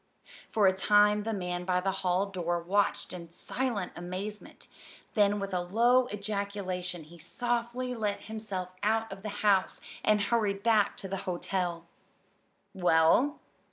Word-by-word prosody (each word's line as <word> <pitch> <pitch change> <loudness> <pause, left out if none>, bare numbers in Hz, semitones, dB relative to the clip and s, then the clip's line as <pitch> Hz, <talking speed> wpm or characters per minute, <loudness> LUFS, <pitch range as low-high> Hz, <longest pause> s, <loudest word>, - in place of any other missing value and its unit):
For 210 -2 +2
a 190 - +6
time 210 +2 +4
the 225 +2 -2
man 180 -3 -3
by 180 0 +1
the 195 +1 0
hall 185 +1 +2
door 175 -3 -2
watched 195 +4 0
in 170 -2 -8
silent 215 +2 -3
amazement; 185 +4 -7 0.5
then 205 -1 +3
with 195 -1 -4
a 180 - +1
low 240 +7 +3
ejaculation 200 -4 -3
he 170 +3 -15
softly 240 +5 -2
let 210 -4 -2
himself 210 -4 -5
out 220 +1 +1
of 195 - -11
the 210 - -4 0.2
house, 195 -2 +3 0.2
and 215 0 +4
hurried 200 -2 0
back 220 -3 +3
to 195 - -6
the 195 +1 -3
hotel. 175 -1 -2 0.9
"Well?" 180 - +3
200 Hz, 145 wpm, -30 LUFS, 180-215 Hz, 0.9 s, a